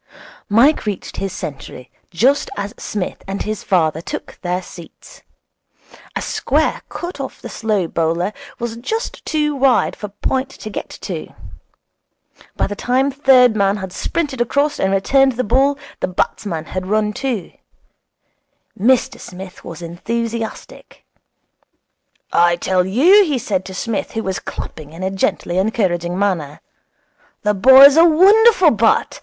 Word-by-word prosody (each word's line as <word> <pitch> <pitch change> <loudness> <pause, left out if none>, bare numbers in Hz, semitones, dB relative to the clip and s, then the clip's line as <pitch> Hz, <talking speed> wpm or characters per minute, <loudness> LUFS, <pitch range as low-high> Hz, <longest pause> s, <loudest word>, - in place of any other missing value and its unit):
Mike 235 +5 +3
reached 200 -3 -4
his 195 -1 -3
century 135 -6 -8 0.2
just 255 +11 +2
as 200 +2 -4
Psmith 205 -4 -4
and 195 +1 -3
his 215 -1 -4
father 160 -4 +1
took - - -7
their 180 0 -2
seats. 175 - -13 0.9
A - - -2
square - - 0
cut 350 -3 -6
off 270 - -6
the - - -8
slow 215 -5 -1
bowler 165 +5 -1 0.2
was 235 -1 -5
just 445 - -4
too 300 -1 0
wide 265 -2 +2
for 210 - -6
point 260 +6 -2
to 215 - -9
get - - -6
to. - - -6 1.3
By - - +1
the 205 - -4
time 260 +6 +1
third 255 -4 +5
man 200 0 +2
had 190 -2 -7
sprinted 285 -7 -2
across 285 +5 0
and 190 - +1
returned 265 +7 +3
the 250 +2 -2
ball 270 +5 +2 0.2
the - - -1
batsmen 180 -2 -2
had 185 0 -5
run 210 +1 0
two. 255 -7 -3 1.3
Mr 245 +5 +2
Smith 185 0 -10
was 165 0 -9
enthusiastic. 225 +6 -5 1.3
'I 175 0 +4
tell 180 +1 0
you,' 340 - +6
he 300 -7 -1
said 195 -5 -2
to 190 - -8
Psmith, 225 +3 -3
who 225 - -3
was 190 -1 -3
clapping 155 -1 -8
in 170 +3 -8
a 190 - -1
gently 185 -1 -1
encouraging 180 -4 0
manner, 170 -8 -1 0.8
'the 210 0 +2
boy's 265 +7 +8
a 330 - +8
wonderful 375 +2 +6
bat. 225 0 +1
215 Hz, 145 wpm, -18 LUFS, 185-265 Hz, 1.3 s, boy's